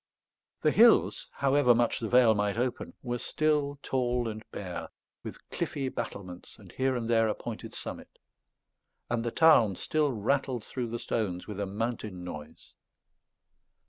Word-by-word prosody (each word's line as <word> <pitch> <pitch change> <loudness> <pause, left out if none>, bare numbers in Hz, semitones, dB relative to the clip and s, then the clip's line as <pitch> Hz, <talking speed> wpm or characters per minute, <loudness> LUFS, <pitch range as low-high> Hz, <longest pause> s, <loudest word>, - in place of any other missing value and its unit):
The 155 - +4
hills, 230 +5 +5
however 135 -3 +3
much 120 0 +1
the 115 - -3
vale 120 -1 +6
might 105 0 0
open, 125 +1 -2
were 120 -1 -2
still 150 -1 0
tall 125 -2 0
and 110 -1 -5
bare, 90 -3 -6 0.3
with - - -10
cliffy 135 -2 -2
battlements 95 -7 -7
and 100 -5 -15
here 130 0 0
and 115 -2 -2
there 115 -1 +3
a 105 - 0
pointed - - -7
summit; - - -7 0.9
and 120 -1 0
the 120 - -1
Tarn 115 - +5
still 150 - 0
rattled 125 +1 -1
through 125 -2 -4
the 115 +1 -4
stones 95 -6 -2
with 105 -2 -7
a 100 - -1
mountain 105 -3 -4
noise. 75 -4 -9
120 Hz, 150 wpm, -29 LUFS, 105-130 Hz, 0.9 s, vale